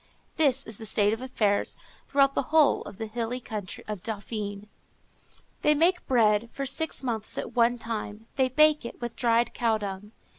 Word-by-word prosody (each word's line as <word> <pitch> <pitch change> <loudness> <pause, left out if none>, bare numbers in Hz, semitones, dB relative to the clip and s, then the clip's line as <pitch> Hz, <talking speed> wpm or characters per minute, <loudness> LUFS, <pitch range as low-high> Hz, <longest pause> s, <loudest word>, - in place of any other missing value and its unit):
That 315 - +5 0.2
is 220 -2 -6
the 220 - -7
state 205 0 +2
of 225 - -4
affairs 215 -6 0 0.3
throughout 275 0 +3
the - - +1
whole 310 -2 +4
of 190 - -9
the 225 - -4
hilly 230 +2 -3
country 210 -6 -6
of 210 -4 -5
Dauphiné. 205 -1 -5 0.9
They 300 - +4
make 350 +4 +2
bread 225 -2 +3
for 275 - -4
six 290 +3 -3
months 225 -4 -3
at - - -4
one 240 0 +3
time; 225 -1 -5
they 260 -1 +2
bake 305 +3 +5
it 235 - -8
with 240 -1 -5
dried 235 -1 +2
cow 230 -2 +1
dung. 205 0 -6
230 Hz, 180 wpm, -27 LUFS, 210-260 Hz, 0.9 s, That